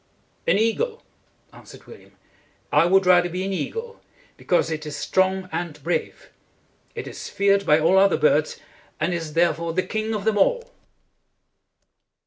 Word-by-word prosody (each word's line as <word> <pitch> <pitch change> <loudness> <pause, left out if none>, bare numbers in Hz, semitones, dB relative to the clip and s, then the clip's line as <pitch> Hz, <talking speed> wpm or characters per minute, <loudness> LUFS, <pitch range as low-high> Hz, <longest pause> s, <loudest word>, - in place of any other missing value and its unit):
"An - - +3
eagle," 440 - -1 0.5
answered - - -15
William. - - -15 0.6
"I 170 - +4
would 190 +1 +3
rather 175 -1 +4
be 180 +2 -4
an 195 - -3
eagle, 460 - -5 0.3
because 175 -2 0
it 155 -1 -4
is 150 - -6
strong 190 0 0
and 175 -3 -4
brave. 175 - -3 0.6
It - - -6
is - - -8
feared 200 -1 +1
by 150 - +5
all 185 +5 +4
other 195 -1 +4
birds, 150 0 +1 0.4
and 170 +4 0
is 165 -3 -5
there 170 0 +3
fore 165 +1 -5
the 185 +2 0
king 220 0 -3
of 205 -1 -5
them 220 -2 +1
all." - - +1
185 Hz, 155 wpm, -23 LUFS, 170-205 Hz, 0.6 s, by